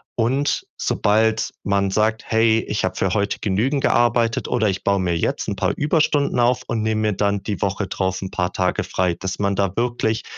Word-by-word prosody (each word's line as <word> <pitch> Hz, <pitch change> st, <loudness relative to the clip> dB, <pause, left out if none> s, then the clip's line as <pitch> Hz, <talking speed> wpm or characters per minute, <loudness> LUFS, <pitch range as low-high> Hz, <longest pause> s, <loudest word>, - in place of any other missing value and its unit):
Und 130 Hz, +5 st, 0 dB
sobald 110 Hz, +2 st, +1 dB
man 100 Hz, -1 st, +1 dB
sagt: 110 Hz, +2 st, +1 dB
„Hey, 110 Hz, 0 st, +3 dB
ich 105 Hz, -, -2 dB
habe 95 Hz, -, -3 dB
für 95 Hz, -1 st, 0 dB
heute 100 Hz, -1 st, -1 dB
genügend 120 Hz, +8 st, 0 dB
gearbeitet, 120 Hz, -1 st, +2 dB
oder 110 Hz, -3 st, +1 dB
ich 95 Hz, -, -3 dB
baue 100 Hz, -1 st, +2 dB
mir 85 Hz, -2 st, 0 dB
jetzt -, -, -1 dB
'n -, -, -2 dB
paar -, -, 0 dB
Überstunden 145 Hz, -3 st, +1 dB
auf 125 Hz, +1 st, +2 dB
und 110 Hz, -, -1 dB
nehme 110 Hz, 0 st, 0 dB
mir 105 Hz, -1 st, +1 dB
dann 100 Hz, 0 st, 0 dB
die 100 Hz, -6 st, -4 dB
Woche 100 Hz, 0 st, -1 dB
drauf 95 Hz, 0 st, -2 dB
'n 95 Hz, -, -5 dB
paar 90 Hz, +1 st, -1 dB
Tage 90 Hz, -1 st, 0 dB
frei." 90 Hz, -2 st, -1 dB
Dass 95 Hz, +1 st, -4 dB
man 100 Hz, -1 st, +1 dB
da 100 Hz, -2 st, 0 dB
wirklich 115 Hz, -2 st, -1 dB
105 Hz, 200 wpm, -21 LUFS, 95-115 Hz, -, Hey